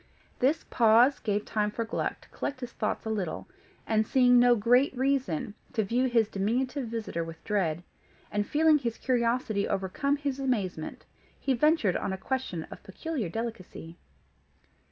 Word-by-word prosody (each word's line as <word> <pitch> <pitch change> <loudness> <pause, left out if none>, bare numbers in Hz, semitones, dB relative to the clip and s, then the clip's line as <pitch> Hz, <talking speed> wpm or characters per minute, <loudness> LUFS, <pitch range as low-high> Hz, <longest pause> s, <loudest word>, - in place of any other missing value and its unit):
This 285 +6 +2
pause 235 +4 +5
gave 205 -1 -1
time 210 -1 0
for 230 +2 -3
Gluck 225 - -3
to - - -20
collect 270 -2 -5
his 245 -1 -5
thoughts 215 - -3
a 220 - -2
little, 195 -6 -3 0.4
and, 220 -1 +2
seeing 245 -2 +5
no 245 0 +6
great 245 +5 +3
reason 260 - 0 0.2
to 220 -4 +1
view 245 +6 +1
his 230 -3 +3
diminutive 245 +7 -1
visitor 220 -7 -3
with 165 0 -10
dread, 175 -5 -1 0.5
and 205 0 -1
feeling 310 0 +4
his 235 -4 -3
curiosity 235 -4 0
overcome 280 +10 -1
his 280 -2 -3
amazement, 200 -12 -2 0.3
he 270 - +1
ventured 260 - +3
on - - -2
a - - -3
question 190 -6 -3
of - - -9
peculiar 245 - -4
delicacy. 190 -6 -6
230 Hz, 155 wpm, -28 LUFS, 200-260 Hz, 0.5 s, no